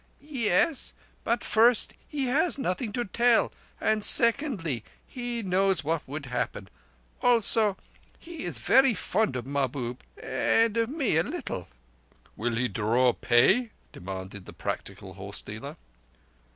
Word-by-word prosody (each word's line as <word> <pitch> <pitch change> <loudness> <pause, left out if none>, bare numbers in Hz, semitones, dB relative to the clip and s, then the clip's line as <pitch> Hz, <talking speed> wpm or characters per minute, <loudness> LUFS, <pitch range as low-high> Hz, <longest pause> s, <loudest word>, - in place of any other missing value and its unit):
"Ye 275 -7 -3
es; 275 - +1 0.3
but 235 +1 0
first, 230 +1 +3
he 285 -3 -2
has 290 +7 +2
nothing 225 -2 -2
to 240 -1 -2
tell; 235 +4 +2 0.3
and 215 -1 +1
secondly, 225 - +5 0.2
he 245 -2 -5
knows 190 -2 +1
what 160 +1 -1
would 145 +1 -6
happen. 125 -5 -4 0.5
Also, 225 -4 +3 0.4
he 335 -2 -9
is - - -4
very 265 -3 +4
fond 195 -6 -1
of 125 -2 -4
Mahbub, 130 -3 -3 0.2
and 225 -1 +1
of 230 0 0
me 275 - 0
a 160 - +3
little." - - -6 0.7
"Will 115 +1 -2
he 125 +2 0
draw 115 +4 +1
pay?" 130 - +3 0.2
demanded 95 +1 -8
the - - -10
practical - - -6
horse - - -4
dealer. - - -8
205 Hz, 135 wpm, -27 LUFS, -, 0.7 s, secondly